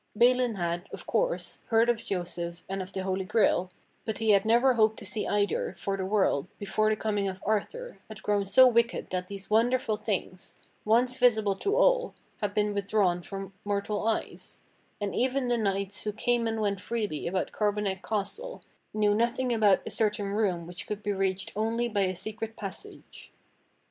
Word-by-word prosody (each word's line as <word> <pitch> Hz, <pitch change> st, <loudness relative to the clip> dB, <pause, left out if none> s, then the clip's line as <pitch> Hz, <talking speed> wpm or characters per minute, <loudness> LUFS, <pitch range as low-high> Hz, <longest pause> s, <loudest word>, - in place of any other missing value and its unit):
Balin 245 Hz, 0 st, +4 dB
had, 175 Hz, 0 st, -3 dB
of -, -, -8 dB
course, -, -, -1 dB
heard 225 Hz, +1 st, +4 dB
of 240 Hz, -2 st, +1 dB
Joseph 175 Hz, -2 st, -4 dB
and 195 Hz, 0 st, -3 dB
of 185 Hz, +1 st, -7 dB
the 190 Hz, -, -4 dB
Holy 190 Hz, 0 st, -1 dB
Grail, 185 Hz, -2 st, +2 dB, 0.3 s
but 220 Hz, -3 st, -3 dB
he 220 Hz, -1 st, +2 dB
had 200 Hz, 0 st, +4 dB
never 240 Hz, +4 st, +4 dB
hoped 220 Hz, -2 st, +3 dB
to -, -, -9 dB
see 215 Hz, -, -2 dB
either, 205 Hz, 0 st, 0 dB
for 195 Hz, -, -2 dB
the 190 Hz, -1 st, -3 dB
world, 190 Hz, -7 st, +1 dB
before 215 Hz, +1 st, 0 dB
the 215 Hz, -, +2 dB
com 215 Hz, -1 st, -1 dB
ing 200 Hz, -, 0 dB
of 190 Hz, -1 st, -4 dB
Arthur, 475 Hz, -, -2 dB
had 220 Hz, -, -11 dB
grown 205 Hz, -1 st, +1 dB
so 260 Hz, +7 st, +7 dB
wicked 235 Hz, -1 st, +1 dB
that 180 Hz, 0 st, -2 dB
these 200 Hz, +1 st, -8 dB
Wonderful 230 Hz, 0 st, +2 dB
Things, 190 Hz, -3 st, -4 dB, 0.3 s
once 245 Hz, +4 st, +3 dB
visible 220 Hz, -6 st, +3 dB
to 405 Hz, -, 0 dB
all, -, -, +3 dB, 0.2 s
had 205 Hz, -1 st, -2 dB
been 210 Hz, -1 st, +1 dB
withdrawn 200 Hz, -3 st, +1 dB
from 195 Hz, +1 st, -7 dB
mortal 205 Hz, +1 st, -1 dB
eyes; 225 Hz, -, -3 dB, 0.4 s
and 205 Hz, -1 st, -2 dB
even 255 Hz, 0 st, 0 dB
the 240 Hz, -, +3 dB
knights 200 Hz, -2 st, -1 dB
who 210 Hz, -, -1 dB
came 235 Hz, +2 st, 0 dB
and 225 Hz, -1 st, -1 dB
went 200 Hz, -2 st, -1 dB
freely 210 Hz, -11 st, -3 dB
about 185 Hz, +2 st, -1 dB
Carbonek 205 Hz, -2 st, -1 dB
Castle 325 Hz, -, -4 dB, 0.3 s
knew 210 Hz, -1 st, +3 dB
nothing 240 Hz, +3 st, +1 dB
about 210 Hz, -4 st, +4 dB
a -, -, -5 dB
certain 210 Hz, -2 st, 0 dB
room 195 Hz, -5 st, 0 dB
which 175 Hz, +1 st, -7 dB
could 210 Hz, 0 st, -5 dB
be 205 Hz, -, 0 dB
reached 195 Hz, -1 st, -1 dB
only 225 Hz, +3 st, 0 dB
by 210 Hz, -3 st, 0 dB
a 185 Hz, -1 st, 0 dB
secret 215 Hz, +4 st, -5 dB
passage. 215 Hz, -, -9 dB
210 Hz, 185 wpm, -28 LUFS, 195-230 Hz, 0.4 s, so